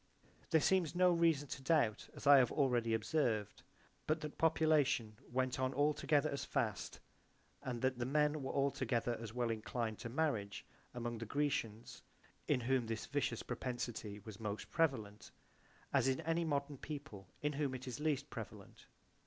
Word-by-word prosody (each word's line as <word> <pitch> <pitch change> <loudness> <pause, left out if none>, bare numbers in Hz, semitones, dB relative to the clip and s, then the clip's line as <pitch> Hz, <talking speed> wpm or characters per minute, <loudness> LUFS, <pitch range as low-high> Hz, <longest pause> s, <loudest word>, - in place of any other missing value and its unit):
There 160 - +5
seems 180 0 +2
no 180 0 +5
reason 165 -4 +3
to 140 - -5
doubt, 135 -7 +2
as - - -9
I 140 0 +9
have 125 - +3
already 120 -5 +2
observed 110 -3 0 0.5
but 155 +1 +1
that 150 -1 -6
population 155 -8 +3 0.2
went 130 0 0
on 130 0 0
altogether 145 0 +2
as 140 - -3
fast - - -2 0.6
and 125 -1 -4
that 130 -1 +1
the 120 - 0
men 150 +1 +2
were 135 - -3
altogether 125 -4 0
as 115 -2 -6
well 120 0 0
inclined 115 0 -3
to 115 - -5
marriage 115 -8 -1 0.3
among 120 -1 -3
the 115 - -5
GreciansOA 120 -5 -2 0.5
in 135 -4 +2
whom 125 -1 +1
this 115 -1 -3
vitious 145 0 -1
propensity 120 -4 -4
was 105 -1 -10
most 105 -1 -4
prevalent 125 -11 0 0.6
as 135 -2 +4
in 130 +1 +2
any 165 +1 0
modern 140 -2 -1
people 140 - -7 0.2
in 150 0 +1
whom 140 -2 -1
it 130 +1 -7
is 125 0 -4
least 150 -3 -1
prevalent. - - -9
130 Hz, 160 wpm, -37 LUFS, 115-150 Hz, 0.6 s, I